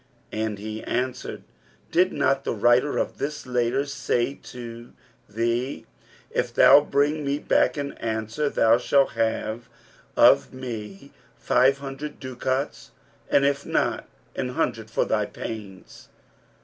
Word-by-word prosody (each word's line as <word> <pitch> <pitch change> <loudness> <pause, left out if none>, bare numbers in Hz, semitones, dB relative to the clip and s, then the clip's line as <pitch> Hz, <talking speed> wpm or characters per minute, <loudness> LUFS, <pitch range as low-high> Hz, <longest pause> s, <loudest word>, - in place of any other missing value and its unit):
and 110 -1 -2
he 110 +2 -6
answered, 125 +1 -3 0.5
'Did 180 +2 +3
not 135 0 +1
the - - -2
writer 120 +6 +3
of - - -2
this 150 +1 -4
letter 125 +2 0
say 130 -2 -1
to 120 -1 -9 0.4
thee, 115 +5 -1 0.5
If - - -1
thou - - +8
bring 145 +1 +1
me 140 0 0
back 150 - +2
an 140 -1 -3
answer, 110 +6 -2
thou 115 -2 +4
shalt 135 +2 +3
have 115 0 -2 0.5
of 70 - +6
me 115 -1 -7 0.3
five 130 +3 +3
hundred 140 +2 -7
ducats; 130 +1 -3 0.4
and 140 - +4
if 140 0 +1
not, - - -1 0.3
an 125 - -2
hundred 110 -3 -2
for 110 - 0
thy 105 -2 0
pains?' 105 -4 -8
125 Hz, 130 wpm, -25 LUFS, 110-140 Hz, 0.5 s, thou